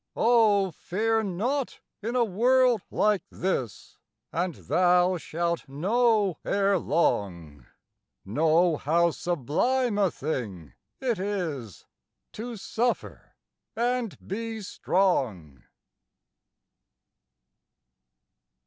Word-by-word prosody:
Oh, 215 Hz, -5 st, +4 dB
fear 220 Hz, +7 st, -1 dB
not 235 Hz, +8 st, -2 dB, 0.2 s
in 230 Hz, +4 st, -3 dB
a 245 Hz, -, +4 dB
world 245 Hz, +3 st, +3 dB
like 210 Hz, -3 st, +2 dB
this, 130 Hz, -, -4 dB, 0.3 s
And 175 Hz, 0 st, -1 dB
thou 180 Hz, +1 st, +2 dB
shalt 170 Hz, -2 st, -3 dB
know 205 Hz, -, +1 dB
ere 200 Hz, -1 st, +2 dB
long, 85 Hz, -, -1 dB, 0.6 s
Know 160 Hz, -, +2 dB
how 170 Hz, +4 st, +2 dB
sublime 205 Hz, -, 0 dB
a 195 Hz, -2 st, +3 dB
thing 105 Hz, -, -5 dB, 0.3 s
it 245 Hz, -7 st, -1 dB
is 165 Hz, -, -4 dB, 0.5 s
To 230 Hz, +1 st, -6 dB
suffer 240 Hz, +4 st, -3 dB, 0.4 s
and 240 Hz, -2 st, -1 dB
be 225 Hz, +2 st, -4 dB
strong. 115 Hz, -, -1 dB
185 Hz, 85 wpm, -27 LUFS, 155-225 Hz, 0.6 s, Oh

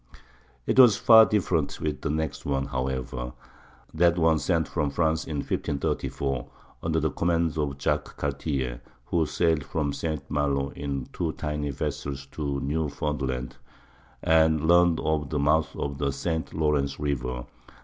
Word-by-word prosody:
It -, -, +2 dB
was 120 Hz, -6 st, +8 dB
far 110 Hz, -1 st, +8 dB
different 85 Hz, -8 st, 0 dB
with 75 Hz, -2 st, -3 dB
the 75 Hz, -, -2 dB
next 75 Hz, -2 st, -2 dB
one, 70 Hz, -1 st, -1 dB
however,—that 65 Hz, +6 st, -3 dB
one 80 Hz, -2 st, +3 dB
sent 80 Hz, -2 st, +1 dB
from 75 Hz, -4 st, -1 dB
France 80 Hz, +2 st, 0 dB
in 75 Hz, -, -4 dB
1534, 70 Hz, -2 st, -2 dB, 0.3 s
under 80 Hz, 0 st, 0 dB
the 80 Hz, -1 st, 0 dB
command 85 Hz, +1 st, +1 dB
of 70 Hz, -3 st, -2 dB
Jacques -, -, -1 dB
Cartier, 70 Hz, -4 st, -2 dB, 0.2 s
who 80 Hz, -3 st, +1 dB
sailed 80 Hz, -3 st, +1 dB
from 70 Hz, 0 st, -2 dB
St. 80 Hz, -1 st, -3 dB
Malo 70 Hz, -2 st, 0 dB
in 70 Hz, -2 st, -4 dB
two 80 Hz, -3 st, -2 dB
tiny 75 Hz, -1 st, -3 dB
vessels 70 Hz, +1 st, -4 dB
to 70 Hz, -3 st, -2 dB
Newfoundland, 70 Hz, -3 st, -2 dB, 0.7 s
and 80 Hz, -1 st, +3 dB
learned 85 Hz, -1 st, +5 dB
of 75 Hz, -2 st, 0 dB
the 75 Hz, -, -1 dB
mouth 75 Hz, +2 st, +2 dB
of 70 Hz, -1 st, -4 dB
the 70 Hz, -2 st, 0 dB
St. 80 Hz, +3 st, -3 dB
Lawrence 75 Hz, -3 st, 0 dB
River. 65 Hz, -4 st, -2 dB
75 Hz, 140 wpm, -26 LUFS, 70-80 Hz, 0.7 s, was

